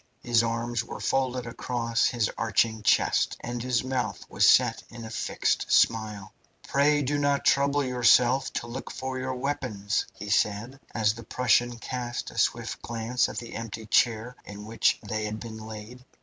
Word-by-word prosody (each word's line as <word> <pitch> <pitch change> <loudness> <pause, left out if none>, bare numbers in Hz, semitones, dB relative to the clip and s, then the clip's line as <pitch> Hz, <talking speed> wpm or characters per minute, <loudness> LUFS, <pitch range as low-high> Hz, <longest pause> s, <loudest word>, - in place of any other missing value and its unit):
His 120 -2 +3
arms 115 0 -1
were 115 - -8
folded 130 -2 0
across 115 0 -1
his 115 -3 0
arching 110 0 +1
chest, - - +2
and 120 0 -4
his 125 -1 0
mouth 125 -6 -3
was - - +4
set - - +4
in 115 -1 -9
a 110 - -8
fixed - - -1
smile. 105 -3 +2 0.3
"Pray 145 +1 +3
do 145 +2 0
not 145 -1 +1
trouble 140 +1 +3
yourself 125 +1 +3
to - - -3
look 120 +3 -7
for 130 0 -4
your 130 0 -3
weapons," 125 -7 -2
he 100 +1 -6
said, 105 +6 0 0.2
as 105 -2 +2
the 115 +1 -10
Prussian 120 0 +1
cast 120 0 -5
a - - -5
swift - - 0
glance 115 +2 -1
at - - -8
the 120 - -6
empty 115 -1 -6
chair 115 +2 +2
in 105 0 -9
which 115 +1 +2
they 110 -1 -2
had 105 +1 -4
been 110 -1 -8
laid. 110 +3 -9
120 Hz, 170 wpm, -27 LUFS, 110-125 Hz, 0.3 s, was